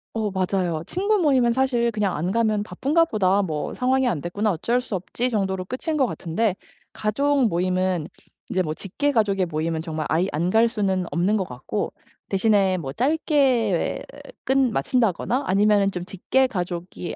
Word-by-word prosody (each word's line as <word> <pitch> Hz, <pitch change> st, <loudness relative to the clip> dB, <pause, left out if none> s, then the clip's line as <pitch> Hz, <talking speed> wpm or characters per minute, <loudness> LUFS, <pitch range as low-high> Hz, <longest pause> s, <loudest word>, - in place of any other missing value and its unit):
어 220 Hz, -2 st, 0 dB
맞아요. 185 Hz, -4 st, -1 dB
친구 405 Hz, +4 st, +1 dB
모임은 260 Hz, -8 st, +3 dB
사실 250 Hz, -2 st, +1 dB
그냥 210 Hz, -3 st, -1 dB
안 175 Hz, +5 st, -1 dB
가면 215 Hz, -2 st, +1 dB
바쁜가 305 Hz, +9 st, +1 dB
보다 200 Hz, -, +2 dB
뭐 155 Hz, -5 st, -3 dB
상황이 260 Hz, +1 st, +1 dB
안 170 Hz, -11 st, -1 dB
됐구나 205 Hz, +6 st, -1 dB
어쩔 230 Hz, +8 st, 0 dB
수 250 Hz, -4 st, -7 dB
없지 235 Hz, +7 st, -2 dB
정도로 190 Hz, -3 st, -1 dB
끝인 305 Hz, -, -3 dB
것 265 Hz, -, +3 dB
같은데 190 Hz, 0 st, -1 dB, 0.4 s
가족 275 Hz, +4 st, +1 dB
모임은 185 Hz, -2 st, 0 dB, 0.4 s
이제 185 Hz, -, +1 dB
뭐 155 Hz, -2 st, -2 dB
직계 285 Hz, -, -2 dB
가족의 200 Hz, -6 st, +1 dB
모임은 160 Hz, 0 st, -2 dB
정말 160 Hz, -2 st, -4 dB
아예 170 Hz, +4 st, +2 dB
안 170 Hz, +4 st, -1 dB
갈 225 Hz, +2 st, +5 dB
수는 190 Hz, -5 st, -1 dB
없는 185 Hz, +5 st, +1 dB
것 190 Hz, -, 0 dB
같고 130 Hz, +11 st, -4 dB, 0.4 s
대신에 195 Hz, -2 st, +2 dB
뭐 135 Hz, -6 st, -5 dB
짧게 260 Hz, -, +1 dB, 0.4 s
끝마친다거나 255 Hz, -2 st, +1 dB
아니면은 200 Hz, +1 st, +3 dB
좀 180 Hz, -2 st, -5 dB
직계 205 Hz, +8 st, +1 dB
가족이 175 Hz, -5 st, -4 dB
205 Hz, 330 characters per minute, -23 LUFS, 180-250 Hz, 0.4 s, 갈